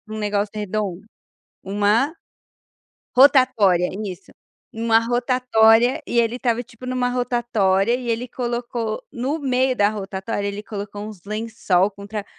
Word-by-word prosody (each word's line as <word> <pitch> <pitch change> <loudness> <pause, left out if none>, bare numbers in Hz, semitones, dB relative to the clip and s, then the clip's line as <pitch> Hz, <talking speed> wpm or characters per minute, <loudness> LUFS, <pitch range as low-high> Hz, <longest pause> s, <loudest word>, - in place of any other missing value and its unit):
um - - -5
negócio 205 -1 -1
redondo 205 -2 -3 0.6
Uma? 205 +9 +2 1.0
Rotatória 255 -10 +5 0.2
isso, 190 -2 -8 0.4
uma 225 0 +2
rotatória, 240 -1 +3
e 240 - +1
ele 230 0 +1
estava 245 -2 0
tipo 245 +1 -13
em 255 - -3
uma 250 -1 0
rotatória, 240 -4 +1
e 250 -2 -5
ele 230 +2 -1
colocou 235 -2 -3
no 265 +6 -2
meio 260 -2 +1
da 205 -3 +3
rotatória 200 0 -4
ele 200 +1 -4
colocou 205 -1 -6
uns 205 -5 -11
lençol 210 -3 0
com 200 0 -11
tra 210 -1 -5
225 Hz, 135 wpm, -22 LUFS, 205-245 Hz, 1.0 s, Rotatória